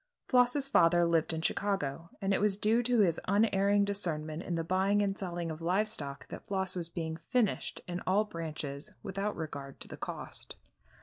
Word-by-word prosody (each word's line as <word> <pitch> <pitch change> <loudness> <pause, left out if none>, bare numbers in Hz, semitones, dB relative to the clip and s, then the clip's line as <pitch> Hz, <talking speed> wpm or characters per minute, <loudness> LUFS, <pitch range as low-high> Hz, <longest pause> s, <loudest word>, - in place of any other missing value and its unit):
Floss's 250 +2 +3
father 175 -9 +5
lived 165 -1 +2
in 160 0 -3
Chicago, 170 -6 -1
and 195 0 +2
it - - +1
was 205 -2 +2
due 220 +3 +3
to 245 -1 +3
his 170 -5 +3
unerring 200 0 +3
discernment 160 -6 -1
in 175 - -3
the 165 - -1
buying 190 +4 +2
and 195 -1 0
selling 175 -4 -3
of 160 +1 -7
live 185 +6 +2
stock 140 -10 -5
that - - -7
Floss 190 -2 -1
was 170 -2 -4
being 160 -2 -4
"finished" 240 -5 0
in 175 0 -3
all 195 +3 +4
branches 155 -5 -5
without 195 +2 -2
regard 140 -4 -6
to - - -9
the - - -9
cost. - - -6
185 Hz, 185 wpm, -32 LUFS, 165-205 Hz, -, father